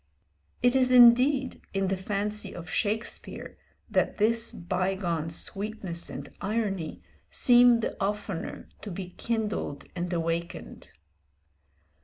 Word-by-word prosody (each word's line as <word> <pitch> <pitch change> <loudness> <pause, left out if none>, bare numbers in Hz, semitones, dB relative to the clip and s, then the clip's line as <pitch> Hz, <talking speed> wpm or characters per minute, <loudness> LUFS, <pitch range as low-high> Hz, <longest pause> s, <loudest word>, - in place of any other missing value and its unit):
It 245 +1 +4
is 255 -1 +4
indeed 255 +2 +6
in 195 0 +1
the 195 - +1
fancy 205 +2 -3
of 170 -1 -8
Shakespeare 220 +1 -3 0.3
that - - 0
this 230 +2 +3
bygone 180 -2 -2
sweetness 195 0 -3
and - - -7
irony 195 -6 -2 0.3
seem 245 -1 +5
the - - -2
oftener 200 -3 -4
to 210 - -7
be 180 0 -6
kindled 215 -9 -3
and 175 0 -3
awakened. 170 0 -4
205 Hz, 110 wpm, -28 LUFS, 175-230 Hz, 0.3 s, indeed